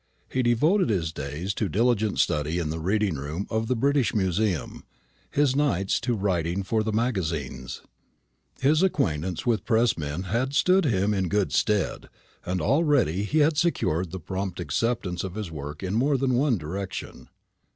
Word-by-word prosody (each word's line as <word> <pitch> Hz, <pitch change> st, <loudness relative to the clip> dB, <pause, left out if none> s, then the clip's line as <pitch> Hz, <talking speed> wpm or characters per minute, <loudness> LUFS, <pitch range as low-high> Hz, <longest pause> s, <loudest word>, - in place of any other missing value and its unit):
He 130 Hz, -, +1 dB
devoted 145 Hz, -, +3 dB
his 85 Hz, -7 st, 0 dB
days 75 Hz, +8 st, -4 dB
to 105 Hz, 0 st, -2 dB
diligent 110 Hz, +2 st, +1 dB
study 75 Hz, +3 st, +1 dB
in 80 Hz, -3 st, -1 dB
the 80 Hz, -, -4 dB
reading 95 Hz, 0 st, 0 dB
room 75 Hz, +8 st, -4 dB
of 110 Hz, 0 st, 0 dB
the 130 Hz, -, +1 dB
British 140 Hz, +1 st, +1 dB
Museum, 95 Hz, -3 st, -1 dB, 0.5 s
his 140 Hz, -2 st, +2 dB
nights 115 Hz, -10 st, +1 dB
to 120 Hz, +1 st, -1 dB
writing 95 Hz, -2 st, -1 dB
for 110 Hz, +3 st, 0 dB
the 110 Hz, +1 st, -1 dB
magazines. 80 Hz, -, -2 dB, 0.8 s
His 150 Hz, +4 st, +3 dB
acquaintance 90 Hz, -, 0 dB
with 115 Hz, -3 st, +1 dB
press 115 Hz, 0 st, +2 dB
men 75 Hz, +4 st, -3 dB
had 120 Hz, +9 st, -1 dB
stood 185 Hz, +3 st, +4 dB
him 105 Hz, -5 st, +1 dB
in 95 Hz, -3 st, 0 dB
good 105 Hz, 0 st, 0 dB
stead; 105 Hz, -3 st, 0 dB, 0.3 s
and 90 Hz, +1 st, -2 dB
already 140 Hz, -, +2 dB
he 155 Hz, +8 st, +2 dB
had 155 Hz, 0 st, 0 dB
secured 90 Hz, -, +1 dB
the 95 Hz, +3 st, -6 dB
prompt 95 Hz, +2 st, -4 dB
acceptance 110 Hz, -7 st, -1 dB
of 95 Hz, -1 st, -5 dB
his 105 Hz, -6 st, -5 dB
work 75 Hz, +2 st, -7 dB
in 95 Hz, +1 st, -2 dB
more 135 Hz, +5 st, +2 dB
than 130 Hz, 0 st, +1 dB
one 125 Hz, -1 st, +2 dB
direction. 90 Hz, +3 st, -6 dB
105 Hz, 165 wpm, -26 LUFS, 85-125 Hz, 0.8 s, stood